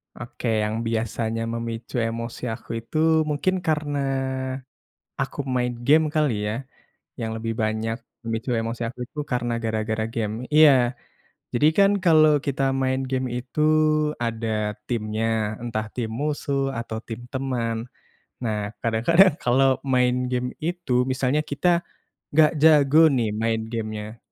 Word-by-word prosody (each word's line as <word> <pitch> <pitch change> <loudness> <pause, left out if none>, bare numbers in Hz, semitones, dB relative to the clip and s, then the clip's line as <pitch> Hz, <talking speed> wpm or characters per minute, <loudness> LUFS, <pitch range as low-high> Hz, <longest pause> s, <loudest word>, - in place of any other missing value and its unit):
Oke, 120 +1 -6 0.2
yang 105 +1 -1
biasanya 115 0 -2
memicu 115 +1 -5
emosi 115 +1 -5
aku 110 - -11
itu 115 +7 -6 0.3
mungkin 150 +6 +1
karena 150 -2 0 1.2
aku 135 +1 -4 0.2
main 125 0 +1 0.2
game 155 +2 +6
kali 150 -3 +3 0.2
ya, 105 - -1 0.7
yang 115 -1 -3
lebih 115 0 -3
banyak 110 +1 -1 0.3
memicu 115 +2 -3
emosi 115 +1 -4
aku 120 - -11
itu 150 - -15
karena 120 -1 0
gara-gara 110 0 -1
game, 110 -2 -1 0.2
iya 155 -1 +8 0.8
jadi 120 +5 +3
kan 200 0 +6
kalo 155 -3 +6 0.2
kita 140 -1 -1 0.2
main 130 0 +1
game 130 -1 0
itu 125 +4 -5 0.6
ada 115 -1 -2 0.4
timnya, 110 -2 -2 0.4
entah 110 -2 -3
tim 115 -3 -3
musuh 145 -2 -1 0.2
atau 115 -1 -4
tim 115 +1 -5
teman. 125 -4 -1 0.7
Nah 110 -3 -1 0.2
kadang-kadang 155 - +4
kalo 125 +2 +2 0.3
main 125 -1 +3 0.2
game 125 0 -1 0.2
itu, 175 -4 -3 0.2
misalnya 130 +3 +1
kita 145 - 0 0.7
gak 155 -1 +7
jago 150 -2 +6 0.2
nih 115 -3 +1
main 115 0 +1
game-nya. 110 0 -5
120 Hz, 130 wpm, -24 LUFS, 115-140 Hz, 1.2 s, iya